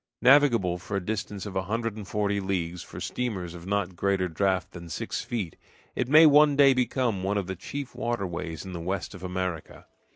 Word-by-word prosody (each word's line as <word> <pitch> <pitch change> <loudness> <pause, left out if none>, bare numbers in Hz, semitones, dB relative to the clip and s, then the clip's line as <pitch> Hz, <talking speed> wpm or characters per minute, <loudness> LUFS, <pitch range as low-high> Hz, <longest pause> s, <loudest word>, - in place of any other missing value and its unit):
Navigable 120 -10 +5
for 100 +3 -3
a 95 - -4
distance 105 -1 -3
of 100 -2 -7
a 95 - +1
hundred 115 +3 -2
and 105 -3 -8
forty 100 -1 0
leagues 90 -3 -2
for - - -9
steamers 95 -9 -3
of 85 +1 -10
not 100 -2 -1
greater 95 0 +1
draught 95 +2 0
than 85 -1 -10
six 75 - -3
feet, 100 -9 -4 0.4
it 125 - -1
may 155 +3 +8
one 150 -1 +6
day 140 -1 +7
become 125 -4 0
one 100 +2 0
of 100 - -1
the 95 +1 -4
chief 140 +9 -6
waterways 90 -7 -3
in 95 - -7
the 85 - -4
west 90 -1 -3
of 95 - -10
America. 90 -3 -4
100 Hz, 200 wpm, -27 LUFS, 90-115 Hz, 0.4 s, may